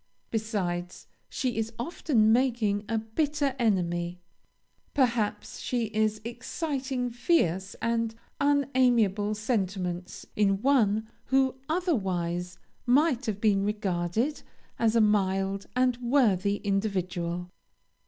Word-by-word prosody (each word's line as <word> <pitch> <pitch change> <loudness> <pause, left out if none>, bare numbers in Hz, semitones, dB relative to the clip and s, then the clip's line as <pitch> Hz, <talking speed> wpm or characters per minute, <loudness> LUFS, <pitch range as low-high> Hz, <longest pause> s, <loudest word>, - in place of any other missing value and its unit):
Besides, 185 -6 -2 0.2
she 250 -4 -2
is 225 +1 -2
often 235 -5 +2
making 230 -5 +1
a 225 - +1
bitter 280 +5 -1
enemy; 175 -5 0 0.8
perhaps 240 -6 0
she 235 -4 -2
is 215 0 +1
exciting 255 +1 -3
fierce 195 - +1
and 230 -1 0 0.2
unamiable 250 -8 +2
sentiments 190 -5 -2
in 195 -1 +2
one 220 -6 +3 0.2
who 265 -1 +2
otherwise 185 - -1 0.3
might 270 0 +3
have 210 -2 -2
been 205 -2 +3
regarded 205 - -1 0.4
as 230 -1 +2
a 230 - +5
mild 195 -2 +1
and 250 -1 +2
worthy 230 -6 +2
individual. 180 -3 -2
220 Hz, 100 wpm, -28 LUFS, 195-250 Hz, 0.8 s, a